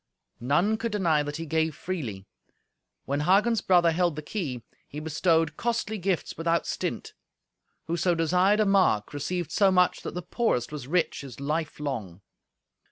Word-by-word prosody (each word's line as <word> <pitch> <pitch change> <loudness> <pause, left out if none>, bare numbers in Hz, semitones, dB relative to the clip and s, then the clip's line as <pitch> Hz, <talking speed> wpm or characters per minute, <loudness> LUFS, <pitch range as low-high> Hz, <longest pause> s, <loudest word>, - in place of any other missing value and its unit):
None 175 - +2
could 230 0 -3
deny 170 -7 +2
that 145 0 -4
he 165 - -5
gave 160 0 0
freely. 125 - -5 0.8
When 140 +1 -1
Hagen's 200 +8 +3
brother 175 -2 +4
held 170 -1 +1
the 155 - -6
key, 145 - -4 0.2
he 150 - -7
bestowed 160 0 +1
costly 230 -2 -1
gifts 185 -1 -1
without 165 0 +1
stint. - - -4 0.7
Whoso 170 +1 +1
desired 180 +5 +3
a - - +3
mark 190 - +2
received 165 +3 -3
so 200 -2 +4
much 180 -1 +3
that - - -6
the 180 - -4
poorest 170 - -1
was 145 -4 -6
rich 175 +3 0
his 135 -3 -10
life 150 +3 -2
long. 110 - -4
165 Hz, 160 wpm, -27 LUFS, 145-185 Hz, 0.8 s, brother